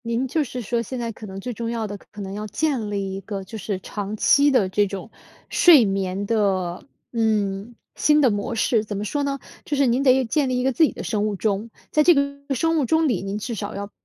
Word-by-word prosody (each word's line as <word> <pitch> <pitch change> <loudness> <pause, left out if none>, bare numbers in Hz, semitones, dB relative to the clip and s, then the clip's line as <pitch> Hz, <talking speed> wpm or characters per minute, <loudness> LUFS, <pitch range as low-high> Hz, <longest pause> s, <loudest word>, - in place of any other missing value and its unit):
您 235 +3 -1
就 310 +4 +1
是 250 -1 -6
说 235 +1 -1
现 250 +3 -5
在 230 -1 -3
可 215 0 -10
能 190 0 -7
最 245 +5 -5
重 230 +1 -4
要 230 -1 -2
的， 205 -1 -5 0.2
可 210 - -9
能 195 -1 -5
要 210 +1 -5
建 250 -1 -1
立 200 -2 -2
一 195 - -5
个 195 0 -5
就 190 - -10
是 200 -1 -3
长 205 +2 -5
期 285 +6 +5
的 255 -9 +3
这 205 +2 +1
种 195 +2 -7 0.4
睡 310 -10 +7
眠 195 0 -1
的， 195 -5 0 0.3
嗯， 215 -1 0 0.2
新 300 0 +4
的 265 -5 +4
模 205 +3 -2
式。 225 0 +2
怎 210 -2 -5
么 205 - -3
说 290 +7 -1
呢， 280 -1 -1 0.3
就 290 - -2
是 280 - +4
您 245 +1 +2
得 260 -1 +4
建 265 +4 +1
立 255 - 0
一 - - -1
个 265 - +2
自 320 - +3
己 310 - +4
的 - - -7
生 210 -1 0
物 210 - -2
钟。 210 +2 -1 0.2
在 305 - +4
这 345 +1 +6
个 280 0 -1
生 325 +5 +1
物 280 - +1
钟 320 +4 +2
里， 235 -10 0
您 195 +1 -3
至 225 +3 -4
少 205 -2 -5
要 200 +1 -6
225 Hz, 270 characters per minute, -23 LUFS, 200-265 Hz, 0.4 s, 睡